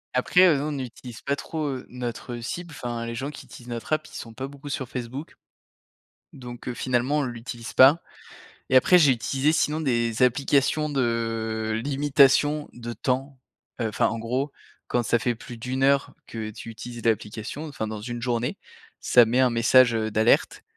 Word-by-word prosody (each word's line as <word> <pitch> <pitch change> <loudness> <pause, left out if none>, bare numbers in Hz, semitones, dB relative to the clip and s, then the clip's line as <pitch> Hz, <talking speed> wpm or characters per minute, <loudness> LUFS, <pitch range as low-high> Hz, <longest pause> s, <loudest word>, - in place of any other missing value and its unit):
Après, 155 +8 +4
heu, 160 -5 +5
nous 145 - -2
on 155 - -2
n'utilise 125 -3 -7
pas 140 0 -1
trop, 155 +1 -4
heu, 130 -2 -5
notre 120 0 -5
cible, 170 +8 -6
enfin, 120 -1 -4
les 115 - -4
gens 140 +5 -4
qui - - -11
utilisent 120 - -13
notre 120 +5 -4
app, 155 0 0
ils - - -18
sont 115 - -8
pas 135 +4 -5
beaucoup 140 +1 -10
sur 130 -2 -3
Facebook 130 +4 -6 1.0
donc 120 -1 -9
heu, 125 - -3
finalement, 130 +4 0
on - - +1
l'utilise 120 -1 -7
pas 140 +6 +7 0.7
et - - 0
après 180 +8 +7
j'ai 145 -5 +6
utilisé 135 +5 0
sinon 155 0 +1
des 120 -4 0
applications 140 +4 +2
de 115 -4 -1
limitation 145 +1 +3
de 120 0 -7
temps, 135 +2 -2 0.4
heu, 115 - +1
enfin, 105 - +1
en 115 - -3
gros, 125 +6 -2 0.4
quand 120 -1 0
ça 120 0 +2
fait 120 0 0
plus 120 +1 -10
d'1 130 +3 -2
heure 140 0 +2
que 110 -1 -5
tu 110 - -10
utilises 120 +1 -9
l'application, 110 +7 -2
enfin, 125 -6 -4
dans 110 -1 -5
une 120 +2 -5
journée. 120 0 -1 0.4
Ça 120 - +6
met 115 +3 0
un 130 -1 +4
message, 115 +1 +5
heu, 110 -1 -1
d'alerte 110 +2 +2
125 Hz, 185 wpm, -25 LUFS, 115-140 Hz, 1.0 s, pas